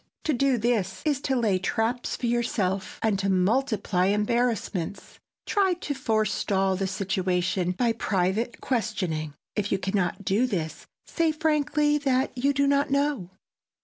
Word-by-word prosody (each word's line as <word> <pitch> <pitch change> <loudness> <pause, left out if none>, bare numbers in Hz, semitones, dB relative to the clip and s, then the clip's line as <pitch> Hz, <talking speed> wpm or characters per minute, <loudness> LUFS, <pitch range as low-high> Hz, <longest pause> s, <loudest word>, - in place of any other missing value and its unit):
To 310 - +1
do 270 0 +2
this 215 -5 0
is 290 -3 +1
to 265 - +2
lay 215 -6 +2
traps 225 +5 -1
for - - -4
yourself 215 -5 -1
and 215 -3 +2
to 195 0 0
multiply 200 -1 +1
embarrassments. 210 -3 -1 0.3
Try 390 -3 +2
to 315 -4 -4
forestall 210 -6 +1
the 190 +1 -1
situation 185 -2 0
by 235 +5 +1
private 210 +2 -1
questioning; 185 - -2 0.2
if 205 -1 -1
you - - +3
can 190 0 -3
not 185 +1 -1
do 220 +7 +2
this 165 -8 -4 0.2
say 330 -2 +1
frankly 300 -1 +1
that 265 -2 0
you 270 +3 +2
do 280 0 +2
not 280 +1 +2
know. 280 -9 0
220 Hz, 145 wpm, -26 LUFS, 190-265 Hz, 0.3 s, you